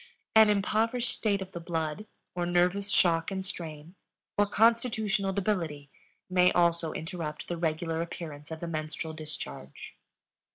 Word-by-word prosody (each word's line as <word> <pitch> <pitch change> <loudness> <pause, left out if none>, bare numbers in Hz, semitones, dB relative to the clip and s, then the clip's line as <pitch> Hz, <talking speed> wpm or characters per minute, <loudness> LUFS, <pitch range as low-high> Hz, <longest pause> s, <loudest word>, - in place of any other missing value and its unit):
An 220 -1 +8
impoverished 225 +4 +1
state 200 -3 0
of 190 - -13
the 170 - -6
blood, 165 +3 -3 0.3
or 175 -1 -1
nervous 180 +3 +2
shock 165 -4 +3
and 190 -1 -3
strain, 160 -3 -6 0.4
or 205 0 +3
constitutional 220 -2 +2
debility 170 -8 -1 0.4
may 180 -1 +4
also 170 -2 +3
interrupt 160 -2 -5
the 175 - -2
regular 165 0 -1
appearance 155 -4 -6
of 160 -1 -6
the 170 - -3
menstrual 160 0 -4
discharge. 155 - -7
175 Hz, 135 wpm, -29 LUFS, 160-200 Hz, 0.4 s, An